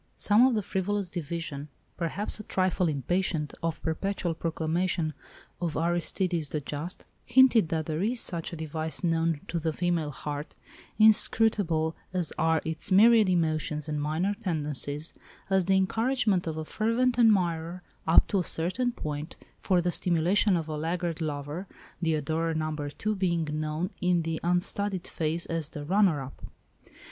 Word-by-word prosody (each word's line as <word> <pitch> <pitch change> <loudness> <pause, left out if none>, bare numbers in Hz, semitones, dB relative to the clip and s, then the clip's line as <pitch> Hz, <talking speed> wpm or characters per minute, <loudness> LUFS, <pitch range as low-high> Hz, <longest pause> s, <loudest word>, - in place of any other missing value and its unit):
Some 220 +5 +5
of 255 - +1
the 210 - 0
frivolous 190 0 -2
division, 160 -3 -5 0.3
perhaps 195 +6 -2
a - - -6
trifle 185 -2 +1
impatient 155 +1 -1
of 165 -1 -2
perpetual 175 +2 -1
proclamation 165 0 -1 0.5
of 170 -3 -2
"Aristides 170 -1 0
the 155 - -2
Just," 150 +4 -6 0.2
hinted 240 -7 +5
that 160 -2 -1
there 155 +1 -2
is 235 +5 0
such 170 -6 -2
a - - -5
device 160 0 -3
known 165 -2 +1
to 170 - -2
the 160 0 -1
female 170 -1 -1
heart—inscrutable 165 +4 +1 0.2
as 180 -4 -1
are 160 -1 +2
its 160 +4 -2
myriad 220 +1 +6
emotions 155 -3 0
and 150 -1 -2
minor 160 +7 0
tendencies—as 160 - -3
the 190 +1 +3
encouragement 220 -1 +1
of 160 -1 -3
a 160 - -4
fervent 235 +6 +1
admirer, 175 -6 +2 0.2
up 165 - +6
to 200 - +2
a - - 0
certain 185 +11 0
point, 150 -7 -5 0.2
for 185 -3 +2
the 175 +1 0
stimulation 180 +4 +2
of 160 -2 -4
a 155 - -3
laggard 165 +2 -2
lover, 150 +4 -4 0.3
the 160 -2 +2
adorer 160 +2 -1
No. 155 0 -1
2 150 +8 -3
being 170 -4 0
known 155 +3 -2
in 180 -2 +2
the 160 0 -2
unstudied 180 +2 0
phrase 165 +1 -1
as 165 -3 -2
the 145 -1 -7
"runner 180 -5 +3
up." 135 - -11
170 Hz, 150 wpm, -28 LUFS, 155-190 Hz, 0.5 s, myriad